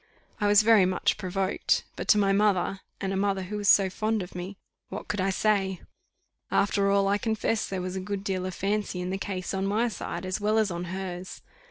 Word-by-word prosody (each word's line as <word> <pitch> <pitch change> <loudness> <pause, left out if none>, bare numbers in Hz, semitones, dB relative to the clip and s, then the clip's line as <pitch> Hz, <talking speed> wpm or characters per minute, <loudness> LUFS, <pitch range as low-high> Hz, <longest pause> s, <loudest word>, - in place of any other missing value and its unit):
I 205 - +1
was 205 +1 +6
very 220 -3 +6
much 185 -1 0
provoked; 190 +1 0
but - - -5
to 210 - +6
my 200 -1 +3
mother, 195 -2 +2 0.2
and 195 -1 -2
a - - -1
mother 195 -1 0
who 205 +3 -5
was 205 -1 +1
so 195 -1 +6
fond 215 +2 -1
of 180 - -11
me, 180 +2 -6 0.3
what 195 - -6
could 205 - -2
I 195 - +1
say? 195 -2 +1 0.7
After 200 0 +2
all, 200 0 +3
I 200 +1 +2
confessed 220 0 -1
there 190 -2 -3
was 185 0 -4
a - - -2
good 200 +1 -4
deal 185 -2 -2
of 185 - -6
fancy 200 -1 -1
in 180 +1 -3
the 195 - -2
case 185 -2 -4
on 195 0 -1
my 220 +4 +1
side 210 - -5
as 185 +2 -2
well 215 +1 +2
as 215 -3 +2
on 175 +1 -4
hers. 185 0 -6
195 Hz, 225 wpm, -27 LUFS, 185-205 Hz, 0.7 s, was